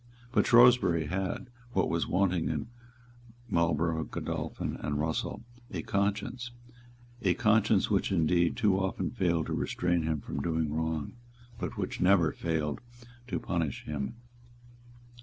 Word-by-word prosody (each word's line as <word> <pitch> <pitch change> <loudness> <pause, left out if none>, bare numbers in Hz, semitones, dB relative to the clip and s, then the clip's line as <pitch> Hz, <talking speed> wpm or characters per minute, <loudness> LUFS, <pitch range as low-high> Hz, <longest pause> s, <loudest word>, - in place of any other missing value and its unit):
But - - +3
Shrewsbury 120 -9 +6
had, 95 - -2 0.3
what 95 - +2
was 85 - 0
wanting 90 -3 +1
to - - -2 0.9
Marlborough, 80 -1 +1
Godolphin - - -4
and 75 0 -2
Russell, 80 +1 -2 0.3
a 85 -5 -4
conscience, 100 +5 -1 0.7
a - - +2
conscience 110 -3 +3
which 100 0 +1
indeed 85 -1 +2
too 100 -4 +3
often 95 -1 -1
failed 85 -7 +1
to - - -3
restrain 90 -1 0
him 80 -1 -1
from 70 - -5
doing 80 -1 -1
wrong, 80 -1 -2 0.5
but 115 - -4
which 95 -3 -3
never 90 -4 +5
failed 80 -3 -2 0.5
to - - -2
punish 80 -6 -2
him. 70 - -3
85 Hz, 130 wpm, -30 LUFS, 80-100 Hz, 0.9 s, Shrewsbury